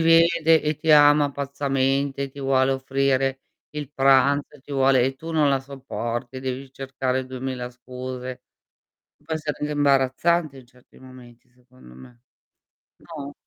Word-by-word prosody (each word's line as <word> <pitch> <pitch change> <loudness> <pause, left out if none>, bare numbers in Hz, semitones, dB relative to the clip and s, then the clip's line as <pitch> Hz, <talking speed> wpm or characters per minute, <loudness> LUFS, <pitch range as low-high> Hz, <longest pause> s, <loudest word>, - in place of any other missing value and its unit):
vede, 165 -1 +4
e 150 0 -1
ti 155 +2 -1
ama 145 -1 +6
pazzamente, 140 0 -1
ti 140 +1 -12
vuole 135 0 +2
offrire 135 0 0 0.3
il 150 -2 -6
pranzo, 135 +2 +3
e - - -22
ti 145 - -11
vuole 135 -2 +3
e 135 0 -1
tu 160 +5 -9
non 155 -3 +2
la 135 -1 +1
sopporti, 130 -2 -6
devi 130 +1 -5
cercare 130 -1 -3
2000 130 -1 -5
scuse. 125 0 -8 0.8
Può 160 - -3
essere 155 -1 -4
anche 150 0 -2
imbarazzante 145 +2 +1
in 125 - -15
certi 125 0 -24
momenti, 125 -2 -16
secondo 125 - -19
me. 120 - -16 0.8
No? 145 -4 -9
135 Hz, 145 wpm, -23 LUFS, 130-145 Hz, 0.8 s, ama